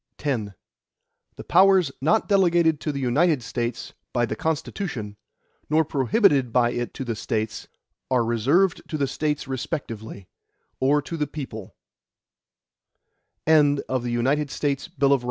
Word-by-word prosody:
X 115 -9 -2 0.8
The - - -9
powers 185 -4 +4
not 210 +11 +2
delegated 175 -6 +3
to 155 - -1
the 140 - -4
United 140 +2 +2
States 120 +1 -4 0.2
by 120 -1 +2
the 110 - -4
Constitution, 150 - -3 0.5
nor 155 +1 +3
prohibited 140 - +2
by 120 0 +3
it 120 0 -4
to 135 - -5
the 115 -2 -2
States, 110 0 -3 0.4
are 125 -3 +2
reserved 140 - +2
to 155 - -2
the 140 - +1
States 150 +1 -2
respectively, 115 - -5 0.5
or 145 +2 +2
to 165 - -5
the 150 -1 -1
people. 130 -9 -8
140 Hz, 115 wpm, -24 LUFS, 120-160 Hz, 0.8 s, powers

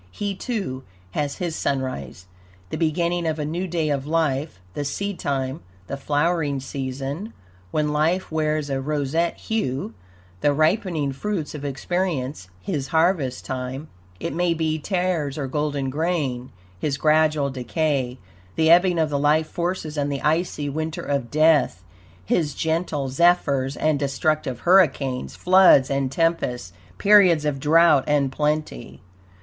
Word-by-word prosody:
He, 205 - -3
too, 195 - -4 0.3
has 145 +6 -2
his 170 -3 -3
sunrise, 130 - -3 0.5
the - - -2
beginning 170 +1 0
of 160 0 -1
a 150 - -2
new 175 +5 -3
day 165 -3 -1
of 140 0 -2
life, 155 -4 0
the 145 - -3
seedtime, 140 -5 -3 0.2
the 140 - -4
flowering 145 +1 0
season, 135 - -5 0.4
when 150 +7 0
life 165 +5 +1
wears 155 -2 -1
a 135 0 -1
roseate 150 +3 -1
hue; 135 - -2 0.5
the 145 +9 +2
ripening 155 -1 +1
fruits 165 +3 -3
of 150 -2 -7
experience, 140 - -2
his 150 -9 -3
harvest 160 -4 +1
time 130 +3 -5 0.3
it - - -3
may 175 +1 +1
be 160 -1 -1
tares 175 -5 -1
or 145 - -2
golden 140 -1 -2
grain; 145 -5 -1 0.3
his 140 +4 -1
gradual 155 -2 +2
decay, 130 0 -1 0.4
the 160 0 +4
ebbing 175 +1 +5
of 160 -2 +1
the 140 - 0
life 150 +2 +3
forces 170 -2 -3
and 145 0 0
the 140 - -4
icy 155 -1 0
winter 155 +2 -3
of 140 -4 -2
death; 155 - +3 0.4
his 150 - 0
gentle 160 -3 -1
zephyrs 140 -2 +2
and 155 -2 +1
destructive 140 -2 -1
hurricanes, 150 -8 +2
floods 180 -8 +5
and 135 -1 0
tempests, 135 - -1 0.2
periods 185 -7 +5
of 145 -2 -1
drought 155 -1 +5
and 145 -3 +2
plenty. 150 - -2
150 Hz, 140 wpm, -23 LUFS, 135-165 Hz, 0.5 s, ebbing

